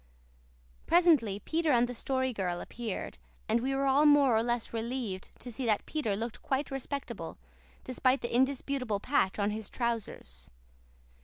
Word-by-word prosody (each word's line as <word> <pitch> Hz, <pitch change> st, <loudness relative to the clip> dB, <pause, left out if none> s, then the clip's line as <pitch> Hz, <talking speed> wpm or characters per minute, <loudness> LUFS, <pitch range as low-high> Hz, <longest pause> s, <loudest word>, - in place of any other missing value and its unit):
Presently 315 Hz, -, +4 dB
Peter 320 Hz, -, 0 dB
and 240 Hz, -1 st, +4 dB
the 245 Hz, -, -5 dB
Story 260 Hz, +1 st, -1 dB
Girl 180 Hz, -4 st, -2 dB
appeared, 230 Hz, -1 st, -5 dB, 0.3 s
and 225 Hz, +2 st, +2 dB
we 270 Hz, +2 st, 0 dB
were 275 Hz, 0 st, +1 dB
all 275 Hz, +3 st, +5 dB
more 285 Hz, -5 st, +6 dB
or 220 Hz, -, +4 dB
less 240 Hz, 0 st, -1 dB
relieved 225 Hz, -4 st, -3 dB
to 245 Hz, -, -7 dB
see 245 Hz, +3 st, -4 dB
that 215 Hz, -2 st, +1 dB
Peter 270 Hz, -10 st, -1 dB
looked 225 Hz, +2 st, -4 dB
quite 275 Hz, +2 st, -1 dB
respectable, 270 Hz, +1 st, -5 dB, 0.5 s
despite 255 Hz, +1 st, +1 dB
the 235 Hz, 0 st, -3 dB
indisputable 260 Hz, -4 st, +1 dB
patch 200 Hz, -5 st, +1 dB
on 205 Hz, 0 st, +1 dB
his 215 Hz, -1 st, -5 dB
trousers. 220 Hz, -, -4 dB
245 Hz, 155 wpm, -31 LUFS, 220-270 Hz, 0.5 s, more